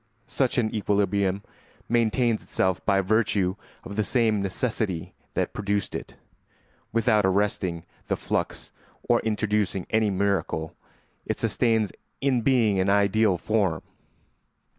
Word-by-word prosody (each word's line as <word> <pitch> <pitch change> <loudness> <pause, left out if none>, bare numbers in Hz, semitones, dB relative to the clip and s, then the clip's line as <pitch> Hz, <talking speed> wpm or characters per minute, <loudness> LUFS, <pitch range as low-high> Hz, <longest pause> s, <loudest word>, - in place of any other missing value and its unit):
Such 125 +1 0
an 110 -3 +1
equilibrium 100 -2 +1 0.4
maintains 115 0 +2
itself 95 -1 -1
by 100 -2 +4
virtue 100 -2 +1 0.3
of 100 - -8
the 110 - +2
same 110 -2 +2
necessity 100 -3 -2 0.2
that - - -1
produced 100 -1 -1
it; - - -6 0.8
without 110 -2 +3
arresting 95 -3 0 0.2
the - - +1
flux - - -3 0.4
or 120 -1 +4
introducing 105 -4 0
any 110 -1 +3
miracle, 95 -5 -1 0.5
it - - -2
sustains 110 -1 +1 0.3
in 135 -3 +1
being 115 -6 +3
an 95 +1 +2
ideal 100 0 +3
form. 95 -5 0
105 Hz, 120 wpm, -26 LUFS, 95-110 Hz, 0.8 s, by